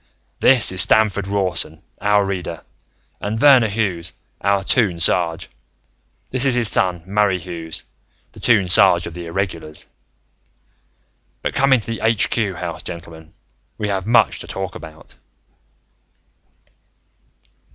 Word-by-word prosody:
"This 125 -7 +4
is 95 -1 +4
Stamford 105 -1 +3
Rawson, 90 -6 -2 0.2
our 105 0 +2
Reader, 90 -4 -5 0.6
and 105 +2 -3
Verner 130 -4 +6
Hughes, 100 -6 -3 0.3
our 100 0 +1
Toon 100 -5 +1
Sarge. 85 0 0 0.8
This 130 0 0
is 135 -3 +3
his 120 -3 +3
son, 90 -3 +2
Murray 100 0 +1
Hughes, 85 -2 -6 0.5
the - - -15
Toon 105 -6 +3
Sarge 90 -1 +4
of 85 - -7
the 85 0 -8
Irregulars. 85 -3 -4 1.6
"But - - -2
come 135 +1 +2
into 125 -5 +3
the 115 0 -5
Aitch 115 -2 +2
Cue 100 -5 -1
House, 85 -1 -5
gentlemen. 85 -2 -10 0.4
We 105 - -3
have 95 0 -2
much 120 +1 +3
to - - -9
talk 95 -1 -5
about." 80 -1 -13
95 Hz, 130 wpm, -19 LUFS, 85-105 Hz, 1.6 s, Verner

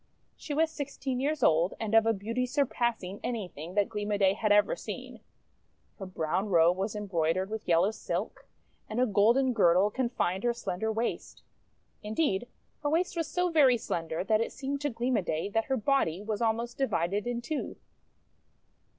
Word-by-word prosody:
She 295 - -5
was 320 +1 +2
sixteen 275 -3 -4
years 290 0 -1
old, 165 +1 +3
and 220 -1 -3
of 225 0 +5
a - - +5
beauty 230 +5 -2
sur 280 +3 +1
passing 225 -7 -2
anything 185 -7 -5
that 205 -1 +3
Gleam 210 -2 -4
o' 205 - +1
Day 195 -1 +4
had 215 +1 0
ever 205 - +4
seen. - - -7 0.8
Her 195 - -6
brown 185 +3 -2
robe 170 -1 +5
was 195 +3 -3
embroidered 185 -1 -1
with 220 0 -5
yellow 175 +4 +3
silk, 220 - -5 0.4
and 215 - -2
a 255 - +4
golden 235 +5 +3
girdle 190 -1 +4
confined 200 -7 -1
her 240 -1 +1
slender 220 -1 -2
waist. 225 +2 -3 0.6
Indeed 215 0 -1 0.3
her 290 - 0
waist 340 +4 0
was 330 -2 -1
so 360 +2 0
very 275 -6 +5
slender 165 -6 -3
that 215 +3 +2
it - - -2
seemed 280 +1 -4
to 290 - 0
Gleam 245 0 0
o' - - +1
Day 165 +2 -2
that 225 +2 0
her 265 - 0
body 205 - +1
was 215 +1 -3
almost 235 +2 -1
divided 200 -4 0
in 240 -1 -1
two. 280 +6 -4
220 Hz, 180 wpm, -29 LUFS, 190-255 Hz, 0.8 s, of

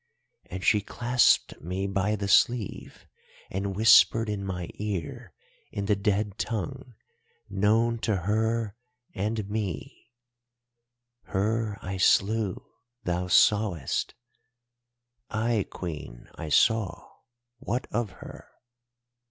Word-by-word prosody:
And 95 +1 -6
she 105 +1 +4
clasped 120 +4 +2
me 90 +4 -3
by 100 +2 0
the 100 -1 -3
sleeve 115 +1 +1 0.5
and 95 +1 -3
whispered 110 +1 +6
in 100 -2 -3
my 90 -3 -4
ear, 100 -6 -5 0.4
in 100 - -3
the 105 0 +2
dead 100 0 -1
tongue 125 +3 -4 0.6
known 115 +3 +2
to 110 -2 0
her 110 +3 0 0.4
and 105 +1 -2
me—'Her 120 +1 -6
I 95 +1 -4
slew—thou 110 -1 0
sawest——' 95 -5 +2 1.1
"'Ay, 110 -1 0
Queen, 75 -9 -7
I 80 - -7
saw—what 120 - -1
of 115 -1 -1 0.2
her? - - -11
105 Hz, 95 wpm, -27 LUFS, 95-120 Hz, 1.1 s, whispered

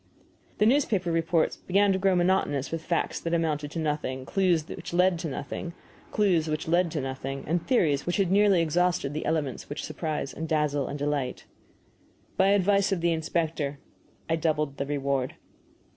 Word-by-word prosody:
The 210 - +3
newspaper 220 -8 +2
reports 165 0 +1
began 200 +2 +2
to 190 - 0
grow 190 -1 +3
monotonous 175 -6 +1
with 165 -1 -3
facts 170 0 -1
that 170 0 -1
amounted 150 -3 -1
to 165 - -7
nothing, 145 -4 -2
clues 175 -4 +1
which - - -6
led 180 -1 +3
to 170 - -3
nothing, 170 +5 -5 1.7
and 170 +4 +1
theories 160 - +2
which 175 - 0
had 190 -3 +1
nearly 200 -3 +4
exhausted 175 -3 +1
the 155 - -3
elements 155 -5 -2
which 145 - -5
surprise 155 -2 -3
and 160 0 -5
delight 150 -3 +1
and 145 - -4
dazzle. 145 -3 0 1.0
By 190 - +4
advice 200 0 +3
of 185 -3 0
the 170 0 +2
inspector 160 -3 -2 0.5
I 165 0 +1
doubled 150 -3 0
the 140 - -3
reward. 140 -2 -1
165 Hz, 155 wpm, -27 LUFS, 145-180 Hz, 1.7 s, nearly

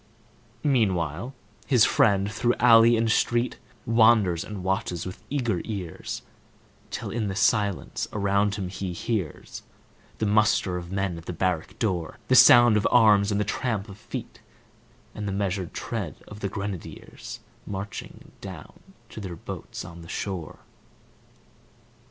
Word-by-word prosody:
Meanwhile, 105 - 0 0.3
his 125 -5 +5
friend, 100 -1 +3
through 120 +2 +1
alley 115 -1 +6
and 115 0 +1
street, 120 +2 +1 0.3
Wanders 110 -6 +4
and 105 -3 -7
watches 95 -3 -1
with 95 0 -7
eager 120 -10 -1
ears, 95 -7 -5 0.7
Till - - -5
in 110 -2 -2
the 95 - -3
silence 105 -3 +1
around 100 0 +1
him 100 -3 -3
he 95 -1 -4
hears 95 -4 -4 0.6
The - - -1
muster 105 -3 +2
of 90 0 -6
men 95 -3 -2
at 85 - -15
the - - -3
barrack 90 +2 -2
door, 95 -4 -2
The 130 - +5
sound 120 -3 +8
of 105 - +2
arms, 105 -4 +5
and 100 - +1
the 105 - +1
tramp 105 -1 -2
of 100 +1 -11
feet, - - -8 0.7
And 105 -1 -5
the - - -1
measured 95 -3 -2
tread - - -4
of 105 - -10
the 100 - -2
grenadiers, 100 -3 -7 0.3
Marching 100 +1 -7
down - - -10 0.3
to - - -9
their 90 -3 -6
boats 85 - -7
on 85 -1 -10
the 85 - -12
shore. 95 -6 -5
100 Hz, 145 wpm, -26 LUFS, 95-110 Hz, 0.7 s, sound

